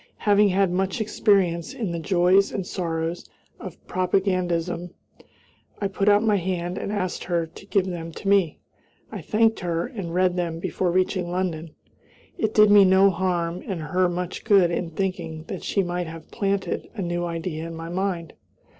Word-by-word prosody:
Having 205 -1 +4
had 190 -1 +2
much 190 +3 -1
experience 195 -6 +1
in 215 -7 -3
the 170 - -3
joys 185 +3 +3
and 195 - -3
sorrows 165 -2 -3 0.3
of - - -8
propagandism, 180 -2 0 0.9
I 200 - -1
put 195 +1 +1
out 205 +1 +5
my 210 -2 +3
hand 180 0 -2
and - - -4
asked 185 -4 -2
her 170 -2 0
to 165 +4 -14
give 195 -2 +2
them 170 -3 -5
to 195 - -7
me. 195 -6 +3 0.5
I - - -6
thanked 225 0 +2
her 170 -2 -1
and 200 -10 -6
read 180 +1 +2
them 170 -2 -2
before 180 +2 -1
reaching 185 0 0
London. 170 -3 -3 0.6
It 220 - -1
did 210 -1 +7
me 205 -1 +8
no 190 +1 +5
harm 175 -1 -1
and 190 -4 -3
her 180 +4 +1
much 180 0 -4
good 195 -5 +4
in 170 0 -2
thinking 165 -3 -3
that 185 +2 -7
she 200 - +1
might 175 -1 -3
have 160 -1 -10
planted 200 -3 -2
a 200 - -3
new 175 0 -2
idea 165 -1 -4
in 165 - -7
my 165 +1 -7
mind. 180 -2 -2
180 Hz, 175 wpm, -24 LUFS, 170-195 Hz, 0.9 s, me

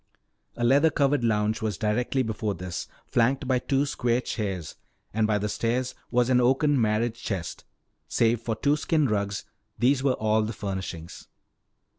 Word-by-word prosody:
A 120 - -2
leather 140 +6 +5
covered 140 -3 +1
lounge 110 -1 +1
was 110 -2 -2
directly 120 +4 0
before 110 -2 -2
this, 90 0 -5 0.2
flanked 130 +3 +1
by 130 -1 +2
two 135 +2 +1
square 120 -4 0
chairs. 95 -10 -4 0.4
And 110 0 +2
by 105 -1 +2
the 105 +1 -1
stairs 120 +4 -1 0.2
was 120 -1 +2
an 125 -1 +5
oaken 135 +2 +3
marriage 110 +1 0
chest. 95 -6 -4 0.4
Save 115 0 +2
for 115 -1 -2
two 145 +5 +2
skin 155 0 +1
rugs, 100 -3 -1 0.3
these 130 +2 +3
were 135 -1 +2
all 110 0 +2
the 110 +2 -2
furnishings. 95 -5 -6
115 Hz, 160 wpm, -26 LUFS, 105-130 Hz, 0.4 s, leather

